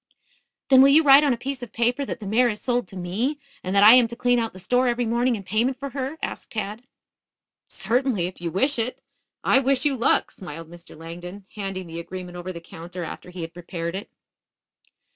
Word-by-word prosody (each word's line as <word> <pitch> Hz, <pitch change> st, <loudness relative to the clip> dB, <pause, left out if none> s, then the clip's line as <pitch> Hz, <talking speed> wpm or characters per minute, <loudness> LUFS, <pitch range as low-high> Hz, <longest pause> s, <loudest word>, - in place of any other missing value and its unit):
"Then, 265 Hz, -1 st, +8 dB
will 275 Hz, -, +7 dB
you 305 Hz, +3 st, +6 dB
write 280 Hz, 0 st, +8 dB
on 290 Hz, -, +3 dB
a 240 Hz, -, 0 dB
piece 265 Hz, +1 st, -5 dB
of 245 Hz, -, -8 dB
paper 240 Hz, +4 st, 0 dB
that -, -, -5 dB
the 210 Hz, -, -8 dB
mare 235 Hz, +5 st, +3 dB
is 210 Hz, -2 st, -4 dB
sold 245 Hz, -4 st, -1 dB
to 190 Hz, -, -11 dB
me, 200 Hz, +11 st, -2 dB, 0.3 s
and 185 Hz, +2 st, -2 dB
that 200 Hz, -, +6 dB
I 215 Hz, +2 st, +10 dB
am 250 Hz, -2 st, +6 dB
to 235 Hz, -, -8 dB
clean 245 Hz, 0 st, +2 dB
out 225 Hz, -1 st, -2 dB
the -, -, -13 dB
store 245 Hz, +8 st, +1 dB
every 240 Hz, 0 st, 0 dB
morning 240 Hz, +2 st, +1 dB
in 200 Hz, -, -7 dB
payment 225 Hz, +7 st, 0 dB
for 275 Hz, +1 st, -6 dB
her?" 275 Hz, +3 st, -4 dB
asked -, -, -5 dB
Tad. 215 Hz, +3 st, -5 dB, 0.8 s
"Certainly, 245 Hz, -6 st, 0 dB
if 180 Hz, 0 st, -7 dB
you 170 Hz, -, -2 dB
wish 260 Hz, -, +1 dB
it. 230 Hz, +3 st, -3 dB, 0.4 s
I -, -, +5 dB
wish 270 Hz, 0 st, +1 dB
you 285 Hz, -2 st, +2 dB
luck," 235 Hz, -, +2 dB
smiled 165 Hz, -2 st, -9 dB
Mr. 170 Hz, -2 st, -13 dB
Langdon, 175 Hz, +4 st, -9 dB
handing 195 Hz, -3 st, -4 dB
the 165 Hz, 0 st, -7 dB
agreement 180 Hz, +1 st, -7 dB
over 175 Hz, +1 st, -5 dB
the 170 Hz, -, -7 dB
counter 170 Hz, +2 st, -8 dB
after 170 Hz, -, -8 dB
he 180 Hz, -1 st, -8 dB
had 165 Hz, +1 st, -6 dB
prepared 170 Hz, -1 st, -5 dB
it. 200 Hz, -, -6 dB
220 Hz, 220 wpm, -24 LUFS, 180-255 Hz, 0.8 s, I